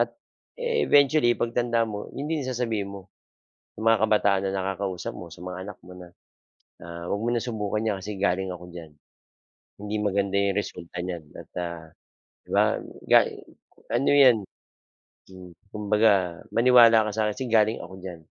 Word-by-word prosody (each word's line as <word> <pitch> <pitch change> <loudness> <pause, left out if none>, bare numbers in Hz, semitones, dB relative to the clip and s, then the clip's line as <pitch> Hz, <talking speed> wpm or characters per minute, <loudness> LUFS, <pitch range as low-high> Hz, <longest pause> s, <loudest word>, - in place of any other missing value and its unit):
at - - +1 0.5
eventually 150 - +3
pagtanda 120 -1 0
mo 105 -2 -6
yun 140 - -6
din 155 -1 -1
sasabihin 115 -6 -2
mo 95 -2 -10 0.7
sa - - -9
mga 115 -2 +4
kabataan 105 -3 +3
na 95 - -3
nakakausap 95 -1 -3
mo 85 - -9
sa 85 +2 -11
mga 90 0 -6
anak 105 - -10
mo 90 - -11
na 90 -1 -12 0.7
na 85 0 -8
huwag 100 +4 -2
mo 115 - -2
na 120 -1 0
subukan 110 -2 -2
yan 105 -3 0
kasi 105 +2 -6
galing 95 -1 0
ako 90 -1 -8
diyan 85 -3 -10 0.9
hindi 105 +1 -4
maganda 100 -1 0
yung 100 0 +2
resulta 90 -3 -7
niyan 90 -2 -4 0.2
at - - -12
ah, 85 -2 -5 0.6
di - - -29
ba - - +5 0.5
gali - - +6 0.6
ano 140 - +1
yan. 125 -3 +7 0.9
Hmm, 90 -1 -12 0.2
kumbaga 105 -4 +2
maniwala 115 -2 +6
ka - - -4
sa 110 - -1
akin - - -3
kasi 130 - -3
galing 110 0 +3
ako 95 - -13
diyan. 90 -3 -8
100 Hz, 165 wpm, -25 LUFS, 90-115 Hz, 0.9 s, yan